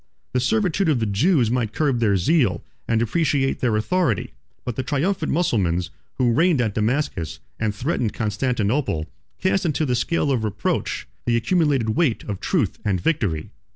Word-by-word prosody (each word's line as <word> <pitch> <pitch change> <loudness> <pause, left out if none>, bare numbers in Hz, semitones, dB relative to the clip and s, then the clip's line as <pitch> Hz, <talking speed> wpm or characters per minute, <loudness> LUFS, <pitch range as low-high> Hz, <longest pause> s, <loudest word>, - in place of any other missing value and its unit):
The 125 - +2
servitude 190 - +1
of 140 -6 +2
the 110 - 0
Jews 120 - +2
might 120 -4 -1
curb 140 -6 +1
their 105 -4 +3
zeal, 100 - +2 0.2
and 115 -1 +2
depreciate 135 +3 +1
their 120 -4 +1
authority; 145 - 0 0.3
but 125 - -3
the - - -1
triumphant 155 +6 -1
Mussulmans, 95 - +1 0.2
who 125 -2 +2
reigned 165 +2 +3
at 110 -4 0
Damascus, 110 - -1 0.2
and 110 -2 -1
threatened 120 -2 -1
Constantinople, 110 - -1 0.3
cast 190 0 +1
into 155 -2 0
the 125 - 0
scale 145 +3 0
of 125 -5 0
reproach 105 -1 -2 0.2
the 120 -1 +3
accumulated 145 -4 +1
weight 120 +1 +1
of 100 -3 -5
truth 145 - 0
and 100 -4 0
victory. 85 - -1
125 Hz, 160 wpm, -22 LUFS, 105-155 Hz, 0.3 s, their